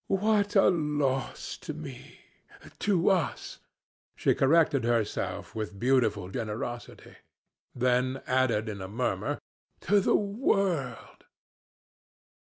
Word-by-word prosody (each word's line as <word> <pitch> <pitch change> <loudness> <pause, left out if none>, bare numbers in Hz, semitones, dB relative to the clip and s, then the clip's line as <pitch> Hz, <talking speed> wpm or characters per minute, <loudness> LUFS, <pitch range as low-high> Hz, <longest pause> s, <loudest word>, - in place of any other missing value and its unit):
"'What 205 +1 +1
a 195 - +6
loss 150 -5 -1
to - - -6
me - - -10 0.6
to 195 -2 +3
us!' 180 -6 -2 0.6
she - - +2
corrected 140 -2 +3
herself 115 -3 -1
with 105 -2 -5
beautiful 110 -7 +1
generosity; 115 +3 -6 0.6
then 125 +1 +1
added 130 -4 +1
in 100 -3 -5
a 95 - -5
murmur, 115 +6 -2 0.4
'To 205 +3 +3
the 195 - +2
world.' 195 - -1
130 Hz, 100 wpm, -28 LUFS, 115-180 Hz, 0.6 s, a